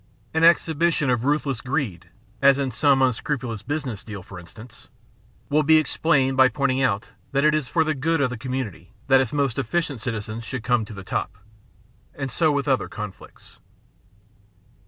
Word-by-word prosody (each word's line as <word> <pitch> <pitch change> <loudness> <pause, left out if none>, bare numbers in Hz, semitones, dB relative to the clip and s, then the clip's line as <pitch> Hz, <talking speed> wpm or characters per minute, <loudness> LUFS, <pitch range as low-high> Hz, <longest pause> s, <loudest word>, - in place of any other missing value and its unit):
An 160 0 +1
exhibition 165 -3 +3
of 120 0 0
ruthless 140 -4 0
greed 120 - -3 0.2
— 105 +3 -33
as 140 -1 +6
in 135 -2 -1
some 135 +3 +3
unscrupulous 125 -3 -1
business 135 -7 -4
deal, 105 -4 -8
for 90 0 -10
instance 110 +7 -14 0.3
— 115 +3 -33
will 150 +1 +4
be 160 +1 +5
explained 140 -4 +2
by 130 -1 +6
pointing 135 +1 0
out 110 -5 0 0.2
that 140 0 +2
it 155 0 +4
is 155 -4 0
for 165 +3 +2
the 155 0 0
good 160 +4 0
of 135 -3 +1
the 125 - -5
com 130 +2 -6
mimity 100 -10 -4 0.2
that 135 0 +6
its 130 - -2
most 140 -4 0
efficient 140 -1 -1
citizens 110 -1 -4
should 130 0 -5
come 120 -3 +1
to 105 - -10
the 100 - -8
top, 95 +1 -3 0.8
and 135 -2 -4
so 155 +6 +2
with 145 0 -1
other 130 -2 +1
conflicts. 105 -3 -10
130 Hz, 185 wpm, -23 LUFS, 115-145 Hz, 0.8 s, as